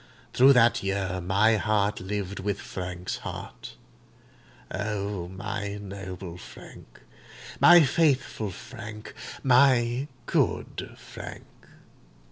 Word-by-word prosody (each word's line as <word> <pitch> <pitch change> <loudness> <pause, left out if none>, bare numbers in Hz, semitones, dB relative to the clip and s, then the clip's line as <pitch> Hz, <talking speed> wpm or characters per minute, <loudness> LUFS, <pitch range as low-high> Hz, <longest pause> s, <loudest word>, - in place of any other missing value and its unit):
Through 135 +2 +7
that 120 -2 +4
year 95 -1 -2
my 105 +5 +3
heart 105 -1 +1
lived 100 0 -4
with 100 +1 -2
Frank's 90 -1 -5
heart. - - -8 1.0
O 100 -2 -3
my 100 +2 -5
noble 95 -3 -8
Frank—my 170 - +1
faithful 135 -7 +1
Frank—my 120 +4 0 0.2
good - - -1
Frank! - - -10
105 Hz, 85 wpm, -27 LUFS, 95-120 Hz, 1.0 s, Through